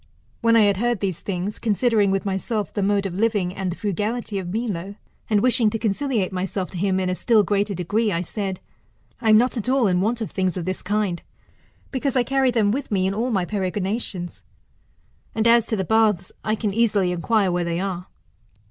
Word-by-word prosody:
When 230 0 +4
I 225 - +6
had 200 -2 +3
heard 240 0 0
these 190 -4 -2
things, 195 +1 -4
considering 220 -2 +2
with 195 +1 0
myself 200 +2 -2
the 205 - -1
mode 200 0 +1
of 190 - -3
living 205 -5 +1
and 190 -1 -3
the - - -5
frugality 210 +1 -2
of 175 -2 -5
Milo, 200 -3 -3 0.3
and 210 -2 +3
wishing 240 -3 +4
to 225 - -2
conciliate 220 -2 -1
myself 185 0 -3
to 185 - -6
him 190 0 +1
in 185 - -1
a 185 - 0
still 215 +3 +3
greater 200 0 0
degree, 205 +5 0
I 170 -2 0
said, 190 +1 -4 0.6
I 225 - +1
am 215 - +8
not 250 +3 +2
at 230 +2 -2
all 265 -2 +3
in 180 -2 +2
want 225 +4 0
of 220 - -4
things 185 -1 -1
of 175 - -3
this 185 0 -3
kind, 200 -3 -1 0.7
because 270 0 -1
I 250 - +4
carry 270 +1 +2
them 220 -4 +2
with 275 +4 -3
me 190 -3 +1
in 190 - 0
all 230 +5 -1
my 195 -6 0
peregrinations. 190 -1 -3 0.9
And 220 +1 +2
as 235 -1 +5
to 220 - 0
the 190 -2 -2
baths, 210 -3 +2
I 215 - 0
can 210 -2 -2
easilv 205 -4 +2
inquire 190 +2 +1
where 175 0 0
they 170 0 -2
are. 185 -2 -3
205 Hz, 210 wpm, -23 LUFS, 185-225 Hz, 0.9 s, am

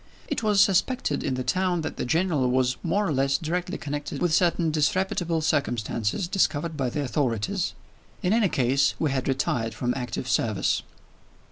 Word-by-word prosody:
It - - -2
was 210 -2 +2
suspected 205 +7 +2
in 130 - -1
the 130 - -2
town 180 +5 0
that - - -5
the - - -2
General 155 -2 +1
was 130 0 +2
more 200 +5 0
or 160 - 0
less 135 +1 +2
directly 175 +4 -3
connected 145 -1 -5
with 175 -3 +1
certain 170 -2 +2
disreputable 165 +2 0
circumstances 120 - -1
discovered 170 -3 0
by 135 -4 -1
the 145 +4 -2
authorities. 120 -4 -1 0.5
In 180 - +2
any 220 -4 +3
case, 135 0 +2
he 155 - 0
had 130 -1 -1
retired 120 -4 -1
from 125 +1 -1
active 125 -4 -4
service. - - +1
150 Hz, 165 wpm, -26 LUFS, 130-180 Hz, 0.5 s, any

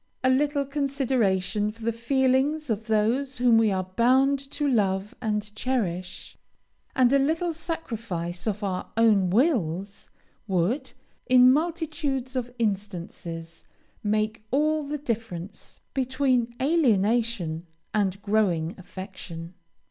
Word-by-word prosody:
A 255 - +4
little 285 +1 +2
consideration 250 -8 0
for 225 +1 -14
the 230 - +1
feelings 265 +4 +1
of 220 +1 -2
those 235 +6 +1
whom 240 -2 +5
we 220 -2 +3
are 190 -1 0
bound 255 +8 +3
to 290 0 -1
love 200 -5 +1
and 210 -1 -2
cherish, 190 -8 -3 0.6
and 255 0 +4
a 280 - +5
little 325 +5 +1
sacrifice 225 - -4
of 210 0 -2
our 185 -2 -2
own 210 -5 +4
wills, 200 - 0 0.4
would, 200 - 0 0.3
in 255 0 +7
multitudes 305 -5 -1
of 245 -1 -2
instances, 175 -6 -4 0.4
make 215 +1 0
all 305 +4 +2
the 290 +1 -3
difference 210 - -5
between 260 -2 +1
alienation 225 - +1 0.3
and 200 -2 +1
growing 190 -6 +1
affection. 185 -3 -8
230 Hz, 115 wpm, -26 LUFS, 195-270 Hz, 0.6 s, in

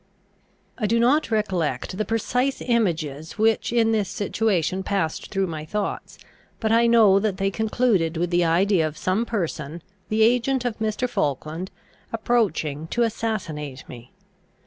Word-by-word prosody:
I 215 - +1
do 230 +3 +2
not 265 +6 +3
recollect 185 - -1
the 215 +2 -1
precise 250 +5 0
images 165 - -1
which 220 +1 +2
in 230 -1 +3
this 210 -4 0
situation 190 -4 0
passed 190 -5 -2
through 195 -1 +1
my 160 -4 -5
thoughts, 205 +6 -4 0.4
but 220 -1 0
I 230 +1 +4
know 220 -4 +6
that 200 -2 -1
they 195 0 0
concluded 215 -6 +1
with 175 +1 -1
the 175 0 +3
idea 170 0 +3
of 155 0 -8
some 200 +6 0
person, 165 -6 -3 0.3
the 220 +1 +3
agent 250 +2 +2
of 235 -3 -2
Mr. 220 +3 -1
Falkland, 155 - -2 0.4
approaching 195 -10 0
to 240 +7 +1
assassinate 170 - -3
me. 120 0 -11
200 Hz, 145 wpm, -24 LUFS, 165-225 Hz, 0.4 s, know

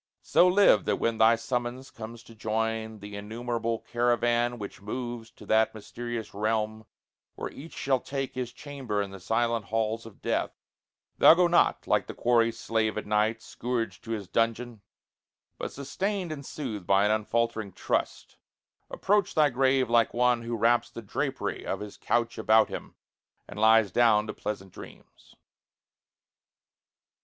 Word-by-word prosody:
So 180 - +5
live, 180 - +5
that - - +2
when 115 -1 -1
thy 110 +1 +6
summons 125 +2 -4
comes 115 +1 -9
to 115 - -15
join 110 0 -2
The 100 0 -8
innumerable 115 +2 -3
caravan 120 0 +2
which 100 -2 -8
moves 120 +1 -5
To - - -15
that 110 0 +2
mysterious 120 +1 -6
realm 110 +1 -1 0.5
where - - -5
each 160 +4 -11
shall 135 -1 +1
take 135 +1 -4
His 125 -1 -4
chamber 130 -5 -5
in 100 - -8
the 95 - -9
silent 115 +2 0
halls 115 +1 -2
of 110 - -15
death, - - -2 0.6
Thou - - +9
go 180 +1 +4
not, 175 0 +3
like - - +1
the - - -7
quarry 115 -1 +3
slave 110 -1 -1
at 110 - -3
night, 110 +2 +1
Scourged 115 -6 -3
to - - -10
his 105 -4 -5
dungeon; 115 +1 -1 0.8
but, - - -4
sustained 185 +6 -3
and 145 -2 -6
soothed 115 - -6
By 100 +1 +4
an 105 - +3
unfaltering 110 -1 -1
trust, - - -2 0.5
approach 205 -1 +1
thy 150 -2 +4
grave 130 0 +2
Like 115 0 +2
one 125 0 +3
who 115 0 -3
wraps 115 +2 +3
the 115 - -9
drapery 130 +6 -3
of - - -3
his 105 -1 -8
couch 120 -1 0
About 110 0 +4
him, - - -7 0.5
and 105 - -9
lies 110 -2 +5
down 110 -1 +4
to 110 - -5
pleasant 95 -3 -6
dreams. - - -14
115 Hz, 155 wpm, -28 LUFS, 110-125 Hz, 0.8 s, Thou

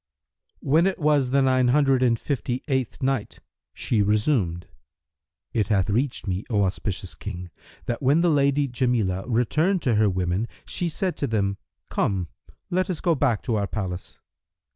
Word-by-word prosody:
When 160 +6 +3
it 190 - -1
was 145 -5 +2
the 135 +1 +3
Nine 130 -1 +3
Hundred 135 0 +3
and 120 -2 +3
Fifty 130 -3 -2
eighth 130 -3 -2
Night, 130 -5 -1 0.3
She 110 -4 0
resumed, 105 - +1 0.9
It 110 -4 +1
hath 100 -2 +1
reached 125 +5 0
me, 95 +1 -2
O 105 -4 +2
auspicious 95 0 -3
King, 90 -3 -7 0.3
that 120 - -3
when 140 +5 +3
the 175 - +3
Lady 140 -1 +2
Jamilah 120 -7 0
returned 155 - +1
to 125 - +2
her 105 -1 +3
women, 90 +3 -1 0.2
she 175 - -2
said 180 +3 -2
to 140 - -1
them, 100 -3 0 0.3
"Come, 95 -4 0 0.4
let 185 +2 +1
us 180 - -2
go 170 - +2
back 130 -7 +1
to 115 -4 0
our 100 -1 -1
palace." 95 -5 -5
120 Hz, 165 wpm, -24 LUFS, 100-140 Hz, 0.9 s, When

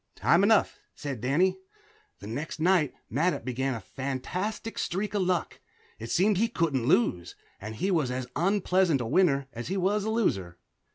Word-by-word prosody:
"Time 170 +3 +3
enough," 215 +1 +3 0.2
said 135 -6 -5
Danny. 180 +9 +2 0.6
The - - -9
next 140 +10 -5
night 170 -3 +3 0.2
Mattup 165 +9 0
began 130 +1 -1
a - - -4
fantastic 145 - -4
streak 200 +3 -2
of 205 - +1
luck. 180 -2 -1 0.4
It 115 +1 -7
seemed 195 - +2
he 230 - +3
couldn't 145 - -1
lose, 90 -9 +1 0.2
and 105 +2 -7
he 190 - -1
was 155 -8 +1
as 125 0 -3
unpleasant 185 -2 +2
a - - -3
winner 140 0 +2
as 120 0 -6
he 190 - -2
was 195 +3 +1
a 220 - -2
loser. 95 - 0
165 Hz, 170 wpm, -28 LUFS, 130-190 Hz, 0.6 s, Time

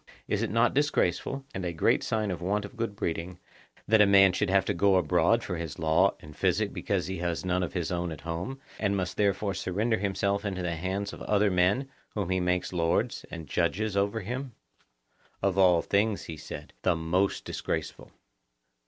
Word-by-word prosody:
Is - - 0
it - - 0
not 115 +4 +3
disgraceful, 135 - 0
and 95 - -4
a 90 - -1
great 80 - +2
sign 110 -3 -1
of 85 - -5
want 100 +3 0
of 100 - -11
good 115 -3 -3
breeding, 85 0 -3 0.5
that 110 0 +5
a 105 - +6
man 95 -1 +6
should 100 +1 0
have 95 0 +3
to 100 - 0
go 100 +1 +3
abroad 90 -5 +3
for 90 - -3
his 80 -3 -5
law 80 +4 +3
and 75 -1 -12
physic - - +1
because - - -1
he 95 0 -4
has 85 0 -2
none 90 0 +1
of 90 - -3
his 90 -1 -2
own 85 -1 -2
at 75 - -7
home, 85 - -4 0.2
and 100 -2 +1
must 90 -1 -2
therefore 100 -1 +1
surrender 110 +5 0
himself 100 +1 0
into 95 -3 -3
the 85 -1 -1
hands 95 +4 -3
of - - -10
other 105 -1 +2
men 95 +9 +2 0.3
whom 100 -4 -2
he 95 - +2
makes 90 0 0
lords 85 -1 0
and 80 - -7
judges 95 +6 0
over 100 +3 +1
him? 125 +5 -5 0.9
Of 100 -2 +2
all 90 -3 +5
things, 105 +1 +1
he 80 - -7
said, 75 - -9
the 90 - +2
most 85 +4 0
disgraceful. - - -4
95 Hz, 195 wpm, -28 LUFS, 90-105 Hz, 0.9 s, a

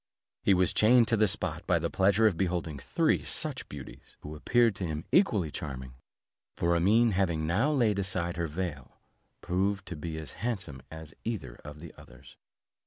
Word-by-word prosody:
He 100 - +4
was 90 -1 +2
chained 115 +1 +5
to 115 - +3
the 110 -1 +3
spot 90 -4 -3
by 90 - +3
the 85 0 -2
pleasure 100 +3 +3
of 105 -5 +4
beholding 85 -4 -2
three - - +1
such - - -1
beauties, - - -11
who 75 +1 -8
appeared 115 +8 +3
to 90 - -3
him 80 0 -4
equally 105 - +3
charming; 65 -7 -6 0.6
for 85 0 +1
Amene 110 +7 +4
having 85 -5 0
now 105 - +1
laid 115 -8 +2
aside 90 -3 -1
her 85 -1 -2
veil, 75 -4 -5 0.4
proved 95 +2 -1
to 90 - -5
be 80 +1 -5
as 80 -1 -6
handsome 95 - -4
as 80 -1 -10
either 110 - -4
of 75 0 -10
the 85 - -10
others. 65 0 -16
90 Hz, 175 wpm, -29 LUFS, 80-105 Hz, 0.6 s, chained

